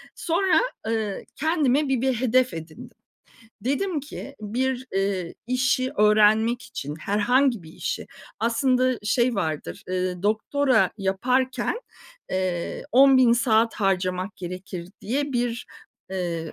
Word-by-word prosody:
Sonra, 340 0 +2 0.3
eee, 220 -3 -2
kendime 300 -3 +1
bir 260 -3 +1
bir 265 0 +2
hedef 255 -1 +2
edindim. 160 -1 -10 0.6
Dedim 300 +6 -1
ki, 280 0 -9
bir, 255 +4 -2
eee, 195 -3 -1
işi 255 +1 +1
öğrenmek 215 +3 +4
için, 145 -6 -6
herhangi 235 - +2
bir 160 - -12
işi, - - -4 0.3
aslında, 255 +2 +2
şey 240 +3 +2
vardır, 155 - -3
eee, 185 -1 -2
"Doktora 255 +6 +2
yaparken, 250 - 0 0.5
eee, 185 -2 -2
10000 260 -2 +6
saat 230 -1 +3
harcamak 185 -1 -1
gerekir." 180 -1 -7
diye 280 +6 -2
bir, 240 -1 -1 0.4
eee, 170 -4 -3
230 Hz, 115 wpm, -24 LUFS, 190-260 Hz, 0.6 s, 10000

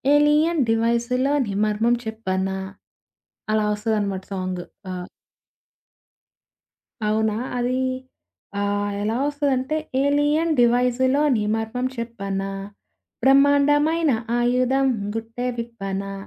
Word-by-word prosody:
Alien 300 +2 +3
డివైస్‌లోనీ 235 +2 +1
మర్మం 220 +3 +2
చెప్పనా? 190 -3 -2 0.9
అలా 215 -1 +2
వస్తదనమాట 205 -3 -1
సాంగ్. 185 -1 -3 0.3
ఆ! 180 -1 -4 2.1
అవునా? 215 0 +1 0.2
అది 250 +1 0 0.8
ఆహ్, 205 0 0
ఎలా 220 +2 0
వస్తదంటే 285 0 0 0.3
ఏలియన్ 290 +3 +2
డివైజులోని 250 +1 +3
మర్మం 225 +3 -2
చెప్పనా? 200 -4 -4 0.7
బ్రహ్మాండమైన 285 +4 +4 0.3
ఆయుధం 255 +2 +2 0.3
గుట్టే 230 +2 -4
విప్పనా. 195 -4 -4
235 Hz, 75 wpm, -23 LUFS, 210-275 Hz, 2.1 s, బ్రహ్మాండమైన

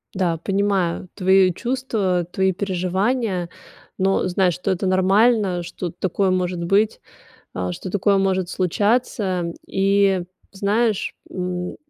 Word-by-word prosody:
Да, 175 -3 0
понимаю 195 -1 0
твои 190 -1 +4
чувства, 220 -8 -1
твои 190 0 +2
переживания, 190 +1 -1 0.5
но 190 0 +1
знай, 185 0 +2
что 180 - -4
это 185 +1 -1
нормально, 190 0 +3
что 175 +1 -5
такое 190 +3 -1
может 180 -1 -1
быть, 200 +5 +2 0.5
э, 90 0 -3
что 180 - -7
такое 200 0 +2
может 190 -2 0
случаться. 185 -2 0
И 195 -1 +2 0.3
знаешь, 205 +2 0 0.2
м, 180 -1 -4
190 Hz, 115 wpm, -21 LUFS, 180-200 Hz, 0.5 s, твои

